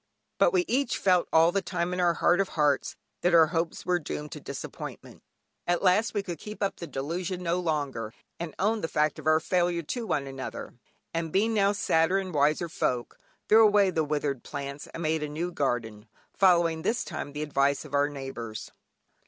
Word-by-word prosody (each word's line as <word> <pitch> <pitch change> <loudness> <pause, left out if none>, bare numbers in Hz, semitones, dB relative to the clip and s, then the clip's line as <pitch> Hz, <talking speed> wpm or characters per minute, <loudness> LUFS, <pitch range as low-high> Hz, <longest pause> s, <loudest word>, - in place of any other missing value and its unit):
But - - +5
we 360 -2 +2
each 270 +3 0
felt 180 -2 +3
all 165 +1 +5
the 195 - 0
time 175 -1 -2
in 180 - -2
our 175 -1 +3
heart 175 +4 +3
of 195 - -2
hearts, 145 -3 +2 0.3
that 175 -1 +3
our 165 -1 +8
hopes 165 0 -2
were 180 -1 +2
doomed 150 -1 -6
to - - -7
disappointment. - - -8 0.5
At 175 +1 +1
last 200 +5 +3
we 205 - 0
could 175 -5 -6
keep 210 0 -6
up 195 - -1
the 170 - -7
delusion 170 +7 -4
no 170 +1 0
longer, 145 -10 -2 0.3
and 170 -2 -5
owned 215 +3 0
the - - +1
fact 150 -1 0
of 155 - -7
our 155 0 +5
failure 175 0 0
to 230 +8 -4
one 140 - 0
another; 135 -1 -7 0.4
and 165 -1 -2
being 215 +6 +2
now 200 -2 +3
sadder 165 -2 +2
and 190 -2 -3
wiser 150 +4 +2
folk, 125 -6 -2 0.3
threw 220 +1 +7
away 205 -3 +5
the 160 -2 +1
withered 145 -3 -1
plants, 140 0 -6
and 170 - -7
made 160 0 0
a 150 - -3
new 165 +4 -3
garden, 115 -8 -2 0.3
following 170 -4 +4
this 225 +8 0
time 145 - -6
the 150 +1 -3
advice 140 -1 +1
of 145 - -12
our 145 +1 +3
neighbours. 135 -6 -7
165 Hz, 200 wpm, -28 LUFS, 145-185 Hz, 0.5 s, our